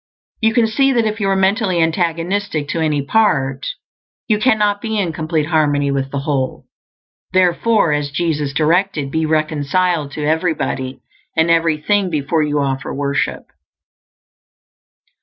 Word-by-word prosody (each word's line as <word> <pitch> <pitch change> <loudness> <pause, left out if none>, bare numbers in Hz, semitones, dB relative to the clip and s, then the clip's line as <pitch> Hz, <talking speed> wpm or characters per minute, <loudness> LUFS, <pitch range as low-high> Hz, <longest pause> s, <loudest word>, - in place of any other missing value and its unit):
You 220 0 +2
can 235 -2 +4
see 270 +5 +2
that 235 -2 +2
if 215 0 -2
you 200 -2 0
are 195 - +2
mentally 190 -1 +1
antagonistic 165 0 -1
to 165 - -2
any 150 -3 0
part, 140 -8 +1 0.6
you 215 -2 +2
cannot 210 -4 +2
be 220 -1 -2
in 180 -5 -1
complete 155 -1 -1
harmony 145 -3 +1
with 135 -1 -1
the 140 0 -3
Whole; 135 -3 -2 0.7
therefore, 185 0 +3
as 145 -1 -1
Jesus 150 -2 -1
directed, 160 -1 +1
be 160 0 0
reconciled 155 +1 0
to 150 - -3
everybody 150 -5 -1 0.4
and 160 +1 +3
everything 165 +4 +2
before 155 0 0
you 150 -1 0
offer 135 -1 -2
worship. 140 0 -2
160 Hz, 140 wpm, -18 LUFS, 145-195 Hz, 0.7 s, can